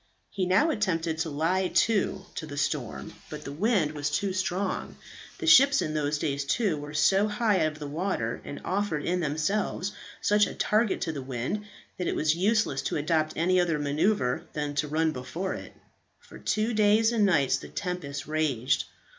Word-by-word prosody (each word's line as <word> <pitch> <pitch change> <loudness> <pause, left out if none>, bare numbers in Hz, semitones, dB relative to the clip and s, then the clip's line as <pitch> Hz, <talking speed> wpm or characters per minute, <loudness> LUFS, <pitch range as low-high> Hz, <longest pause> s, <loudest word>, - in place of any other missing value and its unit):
He 185 -2 -1
now 210 - +4
attempted 165 - -1
to 160 0 -1
lie 165 +6 +1
to 195 -2 +1
to 160 - -5
the 145 -1 -7
storm, 120 - -2 0.2
but 150 -1 -7
the 140 - -6
wind 180 -1 +1
was 145 -1 -2
too 190 +6 -1
strong. 185 +1 -2 0.4
The 360 - -5
ships 280 -2 +7
in 155 - -1
those 150 0 0
days 145 -2 -1
too, 185 +5 +1
were 145 0 -7
so 195 +6 +4
high 210 -2 +1
out 155 0 0
of - - -13
the 150 - -7
water, 145 - -2
and 145 - -7
offered 185 -6 -1
in 180 +1 0
themselves 175 +5 -1 0.3
such 210 0 +3
a - - -7
target 215 0 +1
to 165 - -1
the 145 -3 -5
wind, 130 - -3 0.3
that 180 - -1
it - - 0
was 155 0 +2
useless 200 -5 +1
to - - -2
adopt 155 +1 +1
any 180 +3 +2
other 170 -3 +1
maneuver 145 -1 +1
than 150 -1 -2
to 150 - +1
run 160 +2 +1
before 145 +8 -4
it. - - -8 0.5
For - - -14
two 215 +2 0
days 215 +1 +4
and 225 -3 +2
nights 150 -9 +3
the - - -10
tempest 180 -7 -4
raged. 150 -5 0
165 Hz, 190 wpm, -27 LUFS, 150-200 Hz, 0.5 s, ships